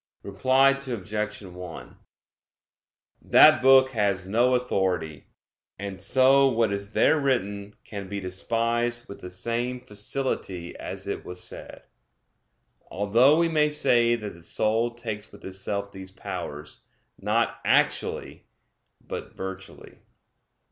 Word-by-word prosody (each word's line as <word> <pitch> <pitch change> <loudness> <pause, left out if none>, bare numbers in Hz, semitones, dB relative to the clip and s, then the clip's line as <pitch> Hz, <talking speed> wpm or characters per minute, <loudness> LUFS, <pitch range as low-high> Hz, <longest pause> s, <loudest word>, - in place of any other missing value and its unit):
Reply 130 +8 +3
Obj. 110 -7 -4
1: 90 -2 -10 1.2
That - - +7
book 130 0 +6
has 100 -5 0
no 120 +5 +3
authority, 95 - -1 0.5
and 95 -2 -6
so 130 +6 +5
what 115 -4 +1
is 100 +1 -5
there 160 - +4
written 105 -7 -1
can 100 -3 -8
be 100 +1 -3
despised 115 +5 -1
with 100 - -10
the 90 - -7
same 120 +7 -3
facility 105 -5 -4
as - - -7
it - - -4
was 90 0 -8
said; - - -9 1.1
although 115 +9 +4
we 170 0 +3
may 155 -2 +2
say 120 -5 +3
that 105 -3 -6
the 85 - -15
soul 115 +7 0
takes 110 -3 -6
with 100 - -14
itself 100 +1 -4
these 95 -1 -9
powers, 75 -5 -7 0.4
not - - 0
actually - - 0 0.5
but - - -7
virtually. 95 0 -8
105 Hz, 120 wpm, -26 LUFS, 95-125 Hz, 1.2 s, That